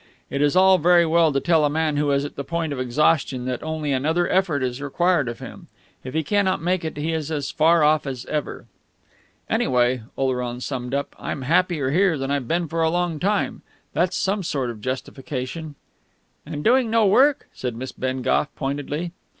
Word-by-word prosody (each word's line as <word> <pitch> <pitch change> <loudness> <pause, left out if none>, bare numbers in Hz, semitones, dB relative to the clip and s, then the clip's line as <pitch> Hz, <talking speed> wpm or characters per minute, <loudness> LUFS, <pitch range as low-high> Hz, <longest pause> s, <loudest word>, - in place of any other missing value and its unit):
It 140 - -1
is 145 +2 +2
all 190 0 +6
very 175 +1 +5
well 165 -1 +3
to 135 - +1
tell 165 0 +3
a 145 - +3
man 155 0 0
who 145 0 +1
is 140 0 +1
at 145 - -8
the 140 - -4
point 165 0 -2
of 135 - -5
exhaustion 130 0 +1
that 125 -1 -3
only 155 -2 -3
another 160 +6 +1
effort 175 -8 +1
is 125 +1 -3
required 150 -1 +1
of 120 - -6
him; - - -10 0.4
if 130 +3 -7
he 160 - +1
cannot 200 +1 +1
make 180 +1 0
it 160 -2 -5
he 155 +3 -1
is 155 -2 -3
as 150 -3 -3
far 165 +1 +4
off 150 -1 +3
as 130 -3 -5
ever.... 150 -1 -4 0.8
"Anyway," 125 -1 +1 0.2
Oleron 125 -2 -1
summed 125 0 -4
up, 140 - -3
"I'm 135 - -4
happier 160 -2 +1
here 180 0 +3
than 135 0 -3
I've 140 -4 -1
been 170 +3 0
for 165 +2 -2
a 160 - +3
long 175 -2 -1
time. 200 +4 0 0.3
That's 175 +2 +1
some 195 +2 0
sort 135 -8 -2
of 115 - -9
a - - -17
justification." 130 +4 -5 0.7
"And 150 - -5
doing 245 0 +3
no 225 -1 +3
work," 265 +8 +4
said 125 -3 -4
Miss 130 +3 -6
Bengough 130 +2 0
pointedly. 145 +4 -3
150 Hz, 200 wpm, -23 LUFS, 130-170 Hz, 0.8 s, all